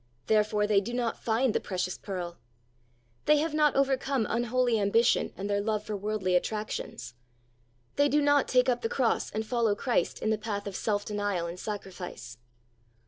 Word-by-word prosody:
Therefore 210 -1 +2
they 205 -1 +3
do 235 +5 -5
not 240 -2 -2
iind 235 +1 +2
the - - +2
precious 185 -1 -3
pearl. 175 -3 -6 0.9
They 300 0 +5
have 310 +1 0
not 300 -2 +3
overcome 270 -2 +1
unholy 240 0 +1
ambition 225 +4 +3
and 195 - -4
their 200 0 +1
love 210 0 -1
for 215 0 -4
worldly 200 -2 -1
attractions. 180 - -3 0.8
They 285 0 +4
do 295 - +3
not 290 -1 +3
take 250 0 +3
up 245 -1 +1
the 225 - -1
cross 245 -4 +1
and 220 +1 -3
follow 230 -3 +1
Christ 245 +3 0
in 220 - 0
the 215 - 0
path 205 -2 -4
of 200 -2 -5
self 205 0 -1
denial 205 -4 -1
and 170 +2 -6
sacrifice. 180 - -7
215 Hz, 175 wpm, -29 LUFS, 200-245 Hz, 0.9 s, They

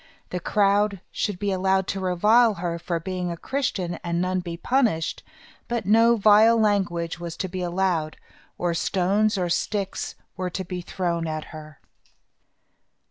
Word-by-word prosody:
The 180 - -2
crowd 200 +1 +2
should 205 -4 -2
be 205 +1 -1
allowed 190 0 +1
to 195 - -2
revile 210 +5 +4
her 170 -1 -3
for 170 0 -2
being 180 +1 -3
a 170 - -4
Christian 195 -8 -2
and 170 -1 -1
none 185 +1 0
be 170 -2 -6
punished; 225 -8 0 0.5
but 235 -4 -2
no 230 +3 +5
vile 215 +2 +6
language 180 -6 0
was 170 -1 -6
to 190 - -2
be 185 0 -5
allowed, 175 -3 -1 0.4
or 175 -1 0
stones 200 +5 +1
or 180 -2 0
sticks 195 +3 -2 0.2
were 185 -1 -3
to 185 +2 -5
be 180 0 -5
thrown 170 -2 -2
at 155 -1 -3
her. 155 -2 -11
185 Hz, 155 wpm, -24 LUFS, 170-205 Hz, 0.5 s, vile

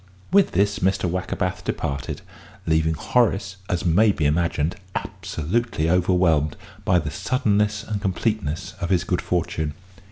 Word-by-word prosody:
With 200 0 +4
this 100 +3 +2
Mr. 95 0 +1
Wackerbath 90 +1 -2
departed, 70 -2 -3 0.4
leaving 80 0 +2
Horace, 100 +1 +1
as 90 -1 -1
may 100 +6 +5
be 80 -6 -1
imagined, 80 +1 +1 0.2
absolutely 80 0 -1
overwhelmed 90 -5 +2 0.3
by 95 -4 +3
the 80 -4 -1
suddenness 105 - +1
and 105 -2 -3
completeness 95 -3 -1
of 85 - -1
his 90 -3 +2
good 90 -1 -1
fortune. 80 -3 -1
90 Hz, 130 wpm, -23 LUFS, 80-100 Hz, 0.4 s, may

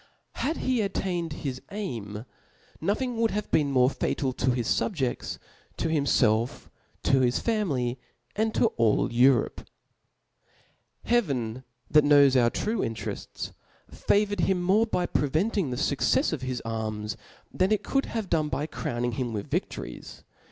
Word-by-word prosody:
Had 315 +4 -1
he 255 -3 +2
attained 180 -4 -2
his 130 -2 -3
aim, 115 - -5 0.6
nothing 230 +7 -1
would 225 0 +2
have 210 -1 -3
been 145 -2 +3
more 130 -2 +4
fatal 130 -2 -1
to 125 - 0
his 120 -2 0
fubjefts, 140 - -1 0.4
to 165 - -1
bimfelf, 125 -7 +1 0.3
to 135 - +4
his 125 -1 +2
family, 140 - -1 0.4
and 220 +1 +1
to 230 - +4
all 115 +1 +2
Europe, 125 0 +3 1.4
Hea 240 +1 +4
ven 130 - -3 0.3
that 150 -1 +6
knows 145 -2 +6
our 120 -2 +5
true 215 - -2
interefts, 115 -8 -4 0.4
favoured 205 -1 +1
him 180 0 +1
more 205 +5 +3
by 180 -5 0
preventing 165 +4 0
the 125 - -3
fuccefs 150 - +1
of 150 - -3
his 130 -1 -3
arms, 110 -2 -3 0.4
than 185 +2 +1
it 210 -1 +2
couid 275 0 0
have 220 -4 -3
done 155 -3 +1
by 150 - -1
crowning 120 -5 -3
him 120 0 -3
with 105 -2 -5
vidories. - - -4
145 Hz, 145 wpm, -27 LUFS, 125-200 Hz, 1.4 s, that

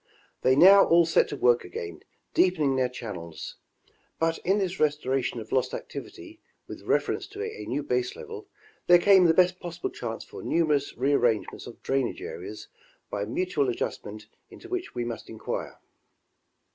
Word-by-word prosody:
They 130 0 +4
now 195 +6 +8
all 170 0 +5
set 160 - +3
to - - -5
work 120 -3 +3
again 85 -2 -7 0.3
deepening 155 -7 +3
their 130 -1 +1
channels. 95 -10 -7 0.6
But 165 0 0
in 195 +3 +1
this 190 -2 -2
restoration 135 -5 0
of 110 -1 -10
lost 130 - +1
activity 340 -3 -9 0.3
with - - -9
reference - - 0
to 405 +1 -6
a 445 0 -6
new - - -2
base 375 +1 -1
level 445 -3 -9 0.4
there 175 - +8
came 190 +1 +6
the 165 - +5
best 180 0 +4
possible 175 -1 -5
chance 115 -2 -5
for - - -10
numerous 150 -4 0
re 135 +4 +2
arrange 120 -6 +2
ments - - -10
of - - -12
drainage 135 - -1
areas 425 -3 -7 0.4
by - - -2
mutual 370 +3 0
adjustment 370 - -4 0.2
into 370 - -13
which 365 - -4
we 120 -1 -2
must 120 -1 -6
inquire. 110 - -5
165 Hz, 165 wpm, -27 LUFS, -, 0.6 s, now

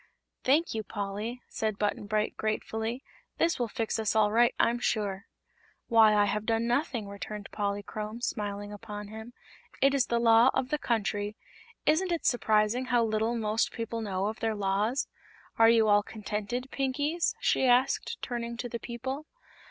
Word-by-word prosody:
"Thank 300 +6 +3
you, 220 - -1
Polly," 210 +3 -5
said 215 -2 -2
Button 205 0 -1
Bright 215 0 0
gratefully. 220 +3 -2 0.3
"This 335 -3 +1
will 240 - +1
fix 225 +1 -2
us 220 -1 0
all 210 -1 +4
right, 235 +2 +4
I'm 235 +1 +3
sure." 200 -4 -1 0.6
"Why, 220 -2 +6
I 205 0 +5
have 210 +1 -2
done 225 0 +1
nothing," 240 -3 0
returned 200 +1 -7
Polychrome, 210 +2 -3
smiling 205 -3 -3
upon 210 -1 -7
him; 220 +2 -9 0.5
"it 275 0 +4
is 270 -3 +2
the 235 - +1
Law 230 +1 +6
of 265 -1 0
the 300 - 0
Country. 210 -3 -1 0.5
Isn't 350 +4 +2
it 340 - -1
surprising 220 +1 +2
how 245 -2 +2
little 220 +1 0
most 220 0 0
people 230 -1 -4
know 195 -3 -2
of 215 +1 -3
their 225 -1 0
Laws? 205 +5 0 0.5
Are 225 0 +8
you 225 -1 +5
all 205 0 +5
contented, 215 +5 -4
Pinkies?" 285 +5 0
she - - +2
asked, 250 +2 +2
turning 235 -1 -4
to 245 - -3
the 235 - -4
people. 260 +6 -5
225 Hz, 165 wpm, -29 LUFS, 210-245 Hz, 0.6 s, Are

